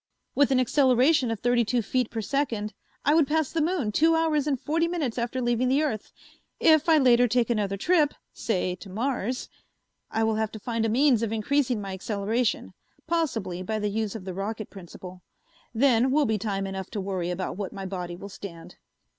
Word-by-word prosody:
With 285 -1 +3
an 265 -2 +3
acceleration 260 +2 +3
of 225 -3 -3
thirty 245 0 +3
two 235 +1 0
feet 250 +2 0
per 225 - -4
second, 225 -4 -2 0.3
I 290 - +4
would 315 -3 +4
pass 310 -1 0
the 330 - 0
moon 305 - 0
two 325 +8 +3
hours 310 -3 +1
and 275 -4 0
forty 330 +5 0
minutes 300 -9 -2
after 240 +2 -2
leaving 240 +1 +1
the 275 +4 +2
earth. 220 -9 -3 0.5
If 315 0 +4
I 320 - +6
later 245 -3 +5
take 240 0 +1
another 200 -3 0
trip, 305 - +2 0.2
say 185 -4 -1
to 195 - -11
Mars, 245 +3 -2 0.6
I 225 - 0
will 220 -1 +1
have 220 -1 -1
to 220 - -7
find 230 +1 -2
a - - +1
means 250 0 +3
of 225 -2 -1
increasing 245 +2 0
my 195 -1 -5
acceleration, 210 +4 -1 0.3
possibly 230 - -1
by 220 +4 -2
the 210 -1 -1
use 215 0 -2
of 200 -4 -7
the 185 - -5
rocket 210 +3 -4
principle. 185 -1 -11 0.5
Then 250 0 +3
will 290 +2 +3
be 220 -2 0
time 195 -1 -2
enough 190 -1 -5
to 210 - -4
worry 190 -3 -2
about 180 +1 -3
what 200 -2 -4
my 195 -1 -7
body 180 -2 -5
will 190 +3 -9
stand." 175 -4 -10
230 Hz, 200 wpm, -26 LUFS, 200-275 Hz, 0.6 s, I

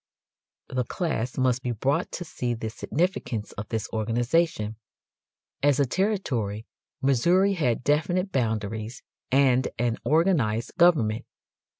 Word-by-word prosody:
The 130 -1 0
class 130 -4 -2
must 130 -1 +2
be 125 -2 -2
brought 135 +6 0
to 175 - -4
see 125 -6 -3
the 110 -1 -5
significance 135 - -2
of 105 +1 -7
this 110 -1 -2
organization. 115 +1 0 0.8
As 145 -1 +3
a 140 - +4
territory 125 - -1 0.4
Missouri 175 +10 +3
had 125 -10 0
definite 175 +7 +1
boundaries 110 -2 -2 0.3
and 130 -1 +4
an 120 -1 0
organized 150 - +1
government. 125 -11 +4
125 Hz, 115 wpm, -26 LUFS, 115-160 Hz, 0.8 s, a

